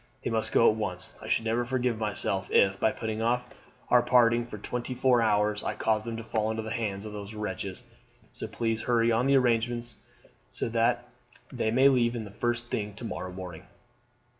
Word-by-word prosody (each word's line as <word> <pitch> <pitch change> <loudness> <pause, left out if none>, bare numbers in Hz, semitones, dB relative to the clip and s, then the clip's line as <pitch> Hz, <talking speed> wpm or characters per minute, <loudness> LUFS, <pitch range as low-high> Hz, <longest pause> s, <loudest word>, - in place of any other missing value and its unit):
They - - -2
must 110 -1 -1
go 115 - +5
at 110 - +4
once. 90 -5 -4
I - - -8
should 115 - +1
never 115 +2 +1
forgive 125 -2 -1
myself 100 -3 -1
if, 95 0 +3
by 110 - +3
putting 110 0 -4
off 120 +2 +1 0.5
our 125 - +6
parting 120 -1 +4
for 105 - -7
twenty 125 +4 -4
four 125 -1 +3
hours, 105 -1 +2
I - - -2
caused 110 0 0
them 115 -1 -3
to 115 - -6
fall 110 -1 -1
into 110 0 -2
the 110 - -5
hands 105 -3 -2
of 105 - -7
these 105 +1 -7
wretches; 100 +1 -5 0.5
so - - -6
please 115 0 -2
hurry 115 -1 +2
on 115 +2 +2
all - - +2
the 140 - +4
arrangements 120 -1 0 0.5
so - - -3
that 120 +1 +1 0.4
they 120 -4 -1
may 130 +4 +5
leave 120 -3 +3
the 110 -4 -5
first 120 +2 -2
thing 105 -4 -3
to 120 - -8
morrow 90 -4 -5
morning." 90 -1 -8
115 Hz, 205 wpm, -28 LUFS, 105-120 Hz, 0.5 s, our